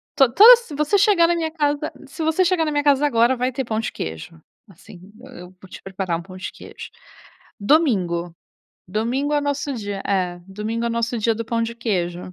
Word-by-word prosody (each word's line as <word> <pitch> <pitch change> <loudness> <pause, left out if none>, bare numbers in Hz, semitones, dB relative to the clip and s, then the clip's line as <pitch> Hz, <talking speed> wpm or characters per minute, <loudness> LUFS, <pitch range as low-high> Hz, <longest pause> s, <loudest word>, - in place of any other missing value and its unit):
To 270 -4 +4
toda 455 - +10
se 470 -11 -11
você 300 +8 +1
chegar 385 -5 +4
na 345 - +1
minha 320 -1 -2
casa 295 -1 -1 0.2
se 315 +4 -6
você 320 +4 +2
chegar 345 -2 +1
na 305 - -2
minha 290 0 0
casa 285 0 +3
agora, 240 -2 +2
vai 250 +1 -1
ter 265 +1 -4
pão 220 -1 -2
de 225 - -3
queijo. 80 - -8 0.3
Assim, 185 +1 -16
eu 265 - -13
eu 180 +1 -12
vou 190 - -15
te - - -11
preparar 190 -3 -3
um - - -8
pão 185 +1 -12
de 185 - -6
queijo. - - -11 0.7
Domingo, 190 - +1 0.5
domingo 240 +9 -2
é - - +3
o - - -3
nosso 285 0 -2
dia 205 -3 -5
é, 180 -3 -1
domingo 215 +4 -4
é - - 0
o - - -3
nosso 235 +1 -2
dia 225 +1 +1
do 230 - -5
pão 230 +1 -2
de 230 +1 -4
queijo. 180 -6 -3
235 Hz, 225 wpm, -21 LUFS, 190-290 Hz, 0.7 s, toda